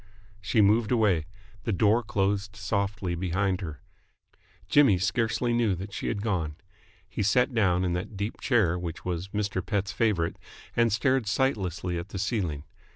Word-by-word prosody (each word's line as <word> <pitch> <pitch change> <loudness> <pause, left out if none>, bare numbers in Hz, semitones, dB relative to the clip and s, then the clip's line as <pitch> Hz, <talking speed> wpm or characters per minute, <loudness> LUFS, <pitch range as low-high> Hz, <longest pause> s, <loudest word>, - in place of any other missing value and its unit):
She 105 +3 +2
moved 105 +3 +3
away. 100 -10 +2 0.4
The 115 - -1
door 105 +4 +3
closed 100 -1 -1
softly 100 -2 -2
behind 95 +2 0
her. 80 -8 -6 0.9
Jimmy 135 -10 +5
scarcely 115 +4 0
knew 115 -5 +2
that 95 +3 -7
she - - -4
had 105 -2 -2
gone. 85 -9 -1 0.5
He 95 +3 -4
sat 125 +6 +3
down 95 -5 +2
in 90 - 0
that 90 +3 -4
deep 100 +3 -4
chair 95 -9 +2
which 85 -2 -6
was 90 0 -2
Mr. 100 -2 -2
Pett's 100 0 -1
favourite, 100 -8 0 0.4
and 115 -1 +3
stared 130 +2 +1
sightlessly 95 - 0
at 85 +4 -8
the 100 - -6
ceiling. 95 -8 -2
100 Hz, 155 wpm, -27 LUFS, 90-110 Hz, 0.9 s, Jimmy